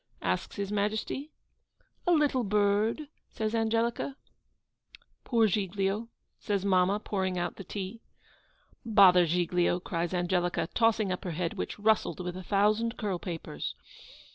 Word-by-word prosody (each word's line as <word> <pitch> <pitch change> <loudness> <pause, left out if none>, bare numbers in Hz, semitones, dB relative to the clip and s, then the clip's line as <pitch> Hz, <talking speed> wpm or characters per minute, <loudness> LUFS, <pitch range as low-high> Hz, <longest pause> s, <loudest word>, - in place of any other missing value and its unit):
asks - - -1
His 200 -1 -3
Majesty. 215 +7 -2 0.8
'A - - +5
little 295 -6 +3
bird,' 210 +5 +2 0.3
says 220 0 -3
Angelica. 230 +4 0 1.1
'Poor 230 -3 +3
Giglio!' 200 +2 -1 0.3
says 200 -2 -1
mamma, 190 +1 +3
pouring 190 -3 -2
out 175 -1 -2
the 195 - -7
tea. 200 +4 -6 0.8
'Bother 190 -6 +6
Giglio!' 175 +1 +1
cries 170 -1 -3
Angelica, 175 -1 0
tossing 225 -4 +2
up 180 - -3
her 180 - -3
head, 175 -2 -1
which - - -4
rustled 215 -1 +1
with 180 -1 -4
a 185 - -6
thousand 210 +5 +1
curl 200 -5 -2
papers. 170 -2 -5
200 Hz, 130 wpm, -29 LUFS, 180-220 Hz, 1.1 s, Bother